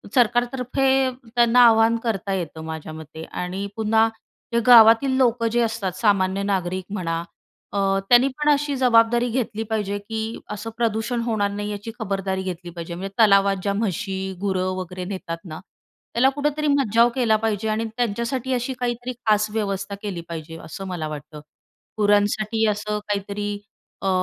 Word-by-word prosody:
सरकारतर्फे 245 Hz, +2 st, +1 dB, 0.5 s
त्यांना 240 Hz, +1 st, +4 dB
आवाहन 225 Hz, 0 st, +5 dB
करता 200 Hz, -4 st, -2 dB
येतं 165 Hz, -4 st, -4 dB
माझ्या 160 Hz, -1 st, -6 dB
मते 160 Hz, 0 st, -9 dB
आणि 185 Hz, +3 st, -4 dB
पुन्हा 220 Hz, 0 st, +3 dB, 0.5 s
ते 235 Hz, -, +3 dB
गावातील 230 Hz, +2 st, +8 dB
लोकं 240 Hz, -3 st, +2 dB
जे 240 Hz, -, +1 dB
असतात, 225 Hz, -5 st, -1 dB
सामान्य 195 Hz, -2 st, +2 dB
नागरिक 185 Hz, -2 st, -1 dB
म्हणा, 165 Hz, -4 st, -2 dB, 0.5 s
अ, -, -, -3 dB, 0.3 s
त्यांनी 245 Hz, +2 st, +6 dB
पण 300 Hz, 0 st, +1 dB
अशी 290 Hz, 0 st, +1 dB
जबाबदारी 240 Hz, -1 st, +4 dB
घेतली 225 Hz, -2 st, -2 dB
पाहिजे 205 Hz, -2 st, -1 dB
की 220 Hz, +2 st, -5 dB
असं 210 Hz, +2 st, -5 dB
प्रदूषण 230 Hz, +1 st, 0 dB
होणार 215 Hz, -4 st, 0 dB
नाही, 205 Hz, +1 st, -4 dB
याची 205 Hz, +2 st, -6 dB
खबरदारी 195 Hz, -2 st, -2 dB
घेतली 180 Hz, -1 st, -5 dB
पाहिजे. 170 Hz, 0 st, -7 dB
म्हणजे 195 Hz, +2 st, -6 dB
तलावात 200 Hz, -2 st, +5 dB
ज्या 200 Hz, -1 st, 0 dB
म्हशी, 190 Hz, -2 st, -2 dB
गुरं 185 Hz, -2 st, 0 dB
वगैरे 185 Hz, 0 st, -5 dB
नेतात 180 Hz, -3 st, -5 dB
ना, 155 Hz, -2 st, -7 dB, 0.5 s
त्याला 260 Hz, +3 st, +4 dB
कुठेतरी 295 Hz, +2 st, -1 dB
मज्जाव 240 Hz, -4 st, +4 dB
केला 235 Hz, -4 st, +3 dB
पाहिजे 220 Hz, -1 st, -1 dB
आणि 220 Hz, +1 st, -1 dB
त्यांच्यासाठी 240 Hz, +3 st, -1 dB
अशी 250 Hz, +1 st, -1 dB
काहीतरी 245 Hz, 0 st, -2 dB
खास 215 Hz, -1 st, +3 dB
व्यवस्था 200 Hz, -2 st, -2 dB
केली 190 Hz, -5 st, -4 dB
पाहिजे, 165 Hz, 0 st, -7 dB
असं 195 Hz, +4 st, -7 dB
मला 170 Hz, -4 st, -4 dB
वाटतं. 150 Hz, 0 st, -8 dB, 0.6 s
गुरांसाठी 210 Hz, +2 st, +2 dB
असं 210 Hz, 0 st, -2 dB
काहीतरी 205 Hz, 0 st, -3 dB, 0.5 s
अ, -, -, +2 dB
210 Hz, 150 wpm, -23 LUFS, 190-235 Hz, 0.6 s, गावातील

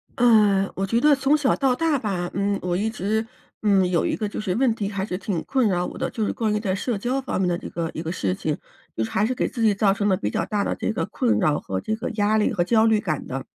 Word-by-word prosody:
呃， 210 Hz, -5 st, +4 dB
我 195 Hz, -, -1 dB
觉 230 Hz, +4 st, +1 dB
得 295 Hz, +3 st, +5 dB
从 275 Hz, +3 st, +2 dB
小 285 Hz, -3 st, +2 dB
到 265 Hz, -2 st, +2 dB
大 320 Hz, 0 st, +1 dB
吧， 185 Hz, -6 st, -2 dB
嗯， 200 Hz, +1 st, 0 dB
我 180 Hz, -1 st, -1 dB
一 210 Hz, +5 st, 0 dB
直 220 Hz, +1 st, -1 dB, 0.4 s
嗯， 195 Hz, -3 st, +3 dB
有 175 Hz, -2 st, +1 dB
一 -, -, 0 dB
个 215 Hz, -, -2 dB
就 205 Hz, -, -6 dB
是 190 Hz, -4 st, -1 dB
问 250 Hz, -1 st, +3 dB
题 205 Hz, -3 st, -3 dB
还 195 Hz, -2 st, -3 dB
是 180 Hz, -, -4 dB
挺 190 Hz, -4 st, -3 dB
困 265 Hz, -4 st, +1 dB
扰 180 Hz, -2 st, 0 dB
我 -, -, -7 dB
的， -, -, -2 dB
就 220 Hz, -, -2 dB
是 -, -, -1 dB
关 220 Hz, -2 st, -1 dB
于 210 Hz, -, 0 dB
在 200 Hz, -3 st, -1 dB
社 220 Hz, +4 st, -2 dB
交 250 Hz, +6 st, -1 dB
方 265 Hz, -, -3 dB
面 190 Hz, -, +1 dB
的 175 Hz, -, +1 dB
这 -, -, -8 dB
个 165 Hz, -1 st, -3 dB
一 -, -, -4 dB
个 165 Hz, 0 st, -4 dB
事 95 Hz, -, -1 dB
情， -, -, -2 dB, 0.4 s
就 110 Hz, -, -1 dB
是 110 Hz, -, -5 dB
还 205 Hz, -, +1 dB
是 255 Hz, +3 st, -1 dB
给 -, -, 0 dB
自 235 Hz, -, -5 dB
己 215 Hz, -3 st, +4 dB
造 200 Hz, -1 st, +3 dB
成 205 Hz, +1 st, -1 dB
了 190 Hz, -, +3 dB
比 105 Hz, -, -2 dB
较 -, -, 0 dB
大 210 Hz, -2 st, -1 dB
的 -, -, -1 dB
这 -, -, -2 dB
个 220 Hz, -, -2 dB
困 245 Hz, -3 st, 0 dB
扰， 150 Hz, -1 st, +2 dB
和 95 Hz, 0 st, -4 dB
这 220 Hz, -, -2 dB
个 225 Hz, +3 st, -4 dB
压 210 Hz, +1 st, +2 dB
力 215 Hz, -, +2 dB
和 175 Hz, -, +1 dB
焦 220 Hz, +4 st, +3 dB
虑 220 Hz, -1 st, +3 dB
感 155 Hz, -8 st, -3 dB
的。 135 Hz, +1 st, -5 dB
205 Hz, 320 characters per minute, -23 LUFS, 185-230 Hz, 0.4 s, 得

